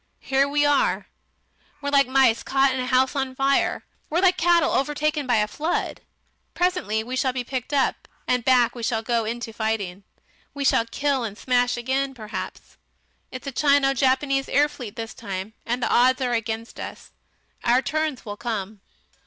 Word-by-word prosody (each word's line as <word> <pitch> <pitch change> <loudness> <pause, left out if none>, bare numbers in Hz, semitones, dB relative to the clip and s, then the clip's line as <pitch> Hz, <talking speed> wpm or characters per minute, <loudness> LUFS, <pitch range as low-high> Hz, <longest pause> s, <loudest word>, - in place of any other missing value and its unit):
Here 270 +1 +1
we 290 0 +2
are! 290 -1 +2 0.7
We're 285 -1 -3
like 275 -2 +4
mice 260 -3 +3
caught 270 0 +2
in 260 - -2
a 250 - -2
house 260 +2 +2
on 265 -2 -2
fire, 275 +1 +1 0.2
we're 330 - +1
like 365 -1 +4
cattle 345 -1 +3
overtaken 295 +1 0
by 245 - +3
a 210 -1 +2
flood. 310 +10 -2 0.5
Presently 355 - 0
we 250 +3 -5
shall 260 0 +1
be 250 -1 -2
picked 255 +2 -5
up, 280 -2 0 0.2
and 250 -1 +1
back 245 -2 +4
we 240 - -8
shall 225 -1 -1
go 230 -1 0
into 230 +1 -4
the 220 - -21
fighting. 205 -4 -2 0.5
We 280 -1 -2
shall 230 -3 +3
kill 275 +1 0
and 210 -2 -5
smash 245 0 +1
again 265 +2 -1
perhaps. 215 -2 -7 0.5
It's 255 - -8
a 275 - -3
Chino 280 0 +3
Japanese 270 +1 +1
air 290 +2 +4
fleet 240 -7 -9
this 225 -1 -6
time, 195 +2 -6
and 240 +1 -1
the - - +1
odds 255 +2 +4
are 245 -1 0
against 225 0 -3
us. - - -8 0.5
Our 245 +2 +3
turns 310 -2 -2
will 205 -1 -6
come. 215 -4 -4
255 Hz, 180 wpm, -24 LUFS, 230-275 Hz, 0.7 s, like